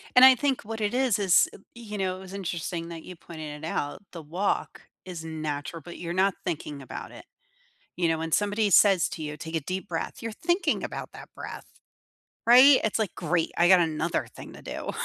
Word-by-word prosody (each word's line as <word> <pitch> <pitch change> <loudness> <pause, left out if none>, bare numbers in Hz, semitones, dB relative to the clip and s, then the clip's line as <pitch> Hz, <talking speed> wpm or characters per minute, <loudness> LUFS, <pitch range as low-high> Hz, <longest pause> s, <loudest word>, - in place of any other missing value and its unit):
And 250 - +9
I 260 0 +10
think 270 0 0
what 225 +1 -6
it 210 +1 0
is 255 -4 +2
is, 190 -4 +5
y - - -11 0.2
you 220 -3 -7
know, 185 -1 -1
it - - -11
was 190 0 -10
interesting 170 -3 -4
that 165 -1 -8
you 180 - -9
pointed 155 -2 -8
it - - -3
out. 145 0 -3
The 170 - -8
walk 175 +7 -2 0.2
is 175 -3 -7
natural, 155 -1 -4
but 175 +3 -10
you're 170 -1 -4
not 190 +1 +2
thinking 150 -5 -4
about 130 - -8
it. - - -12 0.7
You 175 -2 +1
know, 165 -1 +1
when 165 0 -4
somebody 205 +2 +2
says 195 -1 +5
to 160 - -6
you, 150 0 -5
"Take 160 +1 -5
a - - +1
deep 185 +6 -4
breath," 165 -2 -4
you're 230 -1 -4
thinking 345 - 0
about - - -6
that - - -11
breath, - - -8 0.8
right? 255 +4 +8
It's 220 +1 0
like, 215 -3 -1
"Great. 170 -1 0
I 175 - +5
got 185 -1 +8
another 165 0 0
thing - - -10
to - - -12
do." - - -5
180 Hz, 215 wpm, -27 LUFS, 160-210 Hz, 0.8 s, I